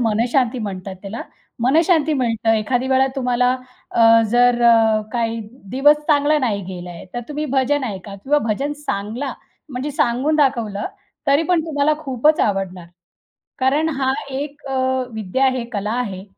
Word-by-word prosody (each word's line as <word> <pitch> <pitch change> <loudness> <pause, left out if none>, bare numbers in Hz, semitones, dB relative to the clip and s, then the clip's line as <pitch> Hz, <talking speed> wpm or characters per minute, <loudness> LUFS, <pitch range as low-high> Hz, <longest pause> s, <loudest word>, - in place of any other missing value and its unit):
मनःशांती 240 +2 +1
म्हणतात 195 -3 -5
त्याला. 205 +3 -6 0.4
मनःशांती 315 +3 +3
मिळतं. 230 -4 0
एखादी 245 +4 0
वेळा 265 0 +4
तुम्हाला 250 -1 +2 0.4
अ, 230 0 +5
जर 245 0 +4
अ, 225 -2 +5
काही 230 -1 -1 0.3
दिवस 285 +5 +5
चांगला 300 0 +3
नाही 215 -8 -1
गेला 180 -1 -7
आहे, 170 - -10
तर 240 - -2
तुम्ही 300 +1 -3
भजन 270 +1 +2
ऐका 195 -3 -6
किंवा 275 +9 +1
भजन 275 +8 -1
सांगला 220 +8 -3 0.4
म्हणजे 265 +1 -4
सांगून 270 +3 +1
दाखवलं 235 -8 0 0.4
तरी 280 +3 +4
पण 355 -2 +3
तुम्हाला 300 -1 +1
खूपच 295 +1 +1
आवडणार. 190 -3 -1 0.7
कारण 285 +5 +2
हा 265 -1 +2 0.2
एक 290 +2 -5
अ, 270 - -4 0.4
विद्या 220 +5 0
आहे, 260 -2 +1
कला 210 0 -2
आहे, 190 -5 -5
245 Hz, 145 wpm, -20 LUFS, 215-280 Hz, 0.7 s, अ